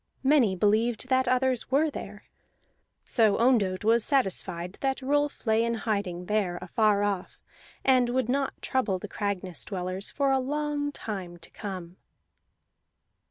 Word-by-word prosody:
Many 265 -8 +4
believed 220 +5 +1
that 260 -1 +2
others 255 -1 +1
were 295 +4 +2
there. - - -8 0.8
So 220 -4 +3
Ondott 220 -6 +2
was 225 +1 +4
satisfied 190 -9 -1
that 270 -1 -1
Rolf 290 +1 0
lay 220 0 +3
in 235 0 0
hiding 200 -6 -2
there 195 -3 0
afar 210 -2 +2
off, 200 -3 -3 0.4
and 255 -2 +4
would 255 -1 0
not 270 +2 -1
trouble 225 -8 0
the - - -7
Cragness 190 -4 -3
dwellers 185 0 -4
for 275 -1 +1
a 265 - +3
long 290 +2 -2
time 190 -9 -6
to 165 -1 -11
come. 185 -4 -7
225 Hz, 140 wpm, -27 LUFS, 190-260 Hz, 0.8 s, Many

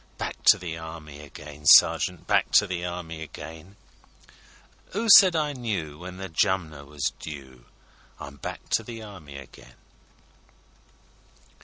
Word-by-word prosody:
â - - -33
Back - - -6
to - - +7
the 85 -3 -6
Army 80 -3 -10
again, 75 0 -12
sergeant, 90 +3 +5
Back - - +2
to 105 - +6
the 90 -3 -4
Army 85 -2 -6
again; 80 +4 -10 1.2
'Oo 225 +3 -1
said 185 -4 +7
I 150 -2 0
knew 95 - -4
when 90 +1 -9
the 95 0 -6
Jumner 80 -4 -1
was 75 -1 -3
due? 65 -5 -10 0.5
I'm 70 -2 -10
back - - -8
to - - +1
the 115 -2 -9
Army 85 -10 -11
again! 70 -2 -14
80 Hz, 140 wpm, -25 LUFS, 75-95 Hz, 1.2 s, to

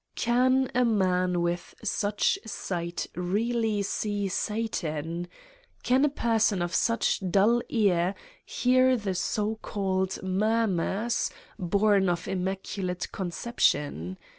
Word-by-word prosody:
Can 255 +2 +2
a 250 - +3
man 185 -5 +2
with 175 0 -3
such 210 - 0
sight 170 -1 -4
really 215 +3 0
see 205 0 -2
Satan? 175 -6 -2 0.6
Can 255 +3 +3
a - - +3
person 220 -8 +1
of 175 - -4
such 230 -3 +1
dull 215 +6 +4
ear 190 -5 +2 0.3
hear 255 0 +3
the 205 -4 -2
so 210 +4 -1
called 190 -2 -1
"murmurs" 210 +2 0 0.3
born 200 +1 +3
of 175 -1 -2
Immaculate 190 -1 -3
Conception? 150 - -1
200 Hz, 105 wpm, -27 LUFS, 180-225 Hz, 0.6 s, dull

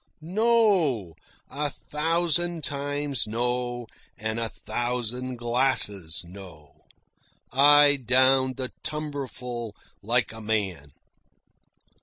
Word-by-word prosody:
No; 185 - +2 0.3
a 145 +1 -3
thousand 165 +3 -1
times 145 -3 -2
no, 120 +2 -2 0.3
and 110 +1 -3
a 115 -1 -2
thousand 125 +3 -3
glasses 115 -9 +2
no. 85 -5 -14 0.7
I 145 +2 +6
downed 130 +1 +3
the 130 -2 -3
tumblerful 130 -7 -5 0.3
like 120 +4 +1
a 110 - -9
man. 95 -10 -3
125 Hz, 85 wpm, -26 LUFS, 110-145 Hz, 0.7 s, I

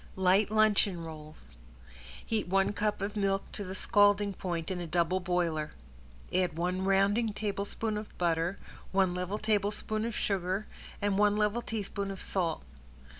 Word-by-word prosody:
~LIGHT 190 +2 +3
LUNCHEON 210 -5 +3
ROLLS~ 155 - -10 0.7
Heat 220 -4 -1
one 195 +2 +2
cup 210 -1 -1
of 205 +1 -3
milk 195 -1 +1
to 205 - -5
the 190 0 -6
scalding 205 0 +3
point 175 -2 -3
in 180 -1 -3
a 175 - -4
double 175 +2 +1
boiler, 170 -4 -1 0.6
add 180 -3 +1
one 180 +2 0
rounding 200 +3 +3
tablespoon 210 +1 -2
of 210 - -11
butter, 170 +1 +1 0.3
one 190 -2 +3
level 180 +3 -2
tablespoon 215 0 0
of 230 - -3
sugar, 190 +1 -1 0.4
and 200 -1 +2
one 210 0 +4
level 210 +2 +1
teaspoon 205 -3 -3
of 195 -1 -6
salt. 170 -5 -1
195 Hz, 150 wpm, -31 LUFS, 180-210 Hz, 0.7 s, one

